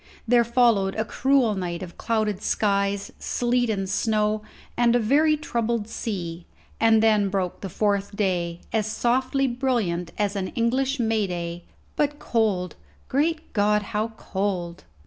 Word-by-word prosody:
There 240 Hz, 0 st, +5 dB
followed 230 Hz, -5 st, +3 dB
a 220 Hz, -, -1 dB
cruel 260 Hz, -2 st, +2 dB
night 180 Hz, -2 st, -3 dB
of 175 Hz, -2 st, -9 dB
clouded 215 Hz, -3 st, -1 dB
skies, 200 Hz, -1 st, 0 dB
sleet, 245 Hz, 0 st, 0 dB
and 195 Hz, -3 st, -1 dB
snow, 210 Hz, +1 st, +1 dB, 0.3 s
and 240 Hz, 0 st, +3 dB
a -, -, +4 dB
very 300 Hz, +7 st, +3 dB
troubled 235 Hz, -6 st, -1 dB
sea; 175 Hz, -8 st, -5 dB, 0.3 s
and 225 Hz, -1 st, +4 dB
then 210 Hz, -3 st, +4 dB
broke 190 Hz, -2 st, -2 dB
the 195 Hz, -, -5 dB
fourth 200 Hz, +1 st, 0 dB
day, 175 Hz, -4 st, -1 dB
as 215 Hz, -2 st, +1 dB
softly 255 Hz, +5 st, +1 dB
brilliant 235 Hz, -10 st, -1 dB
as 205 Hz, -1 st, 0 dB
an 190 Hz, -2 st, -2 dB
English 260 Hz, +4 st, +1 dB
May 220 Hz, -3 st, +1 dB
day, 170 Hz, -1 st, -5 dB, 0.3 s
but 295 Hz, 0 st, 0 dB
cold 205 Hz, -, 0 dB, 0.4 s
great 315 Hz, +4 st, 0 dB
God, 210 Hz, 0 st, +2 dB
how 215 Hz, +1 st, +1 dB
cold! 185 Hz, -, -3 dB
215 Hz, 145 wpm, -24 LUFS, 195-240 Hz, 0.4 s, There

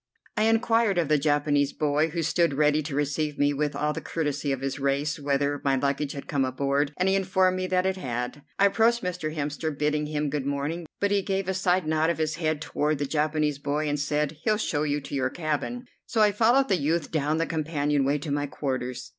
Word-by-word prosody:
I 215 Hz, -1 st, +2 dB
inquired 225 Hz, -2 st, +3 dB
of 165 Hz, -4 st, +1 dB
the 150 Hz, -1 st, +4 dB
Japanese 145 Hz, -1 st, +1 dB
boy, 150 Hz, +1 st, +1 dB
who 165 Hz, +1 st, -2 dB
stood 165 Hz, -1 st, +2 dB
ready 150 Hz, +1 st, +3 dB
to 145 Hz, -2 st, -5 dB
receive 150 Hz, +1 st, -1 dB
me 145 Hz, 0 st, +2 dB
with 145 Hz, +1 st, -1 dB
all 150 Hz, 0 st, 0 dB
the -, -, -5 dB
courtesy 145 Hz, -3 st, -2 dB
of 135 Hz, -1 st, -2 dB
his 135 Hz, +1 st, -3 dB
race, 140 Hz, +3 st, 0 dB
whether 140 Hz, 0 st, 0 dB
my 135 Hz, -1 st, +2 dB
luggage 140 Hz, +1 st, -1 dB
had 140 Hz, -, -7 dB
come 140 Hz, -2 st, +1 dB
aboard, 140 Hz, +2 st, 0 dB
and 185 Hz, -, +1 dB
he 190 Hz, -, +3 dB
informed 185 Hz, -1 st, +2 dB
me 185 Hz, 0 st, -2 dB
that 185 Hz, 0 st, +1 dB
it 190 Hz, 0 st, 0 dB
had. 125 Hz, -2 st, -4 dB, 0.2 s
I 200 Hz, -, +5 dB
approached 230 Hz, +3 st, +3 dB
Mr. 180 Hz, -4 st, -3 dB
Hemster, 150 Hz, +1 st, -2 dB
bidding 150 Hz, 0 st, 0 dB
him 150 Hz, -1 st, -2 dB
good 140 Hz, -2 st, -2 dB
morning, 145 Hz, +4 st, -2 dB
but 200 Hz, 0 st, +1 dB
he 200 Hz, -1 st, +3 dB
gave 195 Hz, -1 st, -2 dB
a 190 Hz, -, 0 dB
side 185 Hz, -1 st, +1 dB
nod 155 Hz, +1 st, +1 dB
of 170 Hz, -, 0 dB
his 155 Hz, 0 st, -1 dB
head 155 Hz, -2 st, -1 dB
toward 150 Hz, -1 st, 0 dB
the 145 Hz, -, -1 dB
Japanese 150 Hz, 0 st, 0 dB
boy 150 Hz, +1 st, -1 dB
and 145 Hz, 0 st, -1 dB
said, 150 Hz, +1 st, -1 dB
"He'll 215 Hz, -1 st, +2 dB
show 165 Hz, -8 st, -1 dB
you 145 Hz, -1 st, 0 dB
to 140 Hz, -, -10 dB
your 130 Hz, -2 st, +1 dB
cabin," 165 Hz, -, -3 dB, 0.2 s
so 225 Hz, -, -1 dB
I 210 Hz, -1 st, +5 dB
followed 235 Hz, +6 st, +3 dB
the 190 Hz, -, +3 dB
youth 160 Hz, +1 st, -1 dB
down 155 Hz, 0 st, 0 dB
the 165 Hz, -, +1 dB
companion 150 Hz, -3 st, 0 dB
way 140 Hz, +2 st, +2 dB
to 145 Hz, 0 st, -5 dB
my 145 Hz, 0 st, 0 dB
quarters. 130 Hz, -3 st, -4 dB
150 Hz, 230 wpm, -26 LUFS, 145-175 Hz, 0.2 s, I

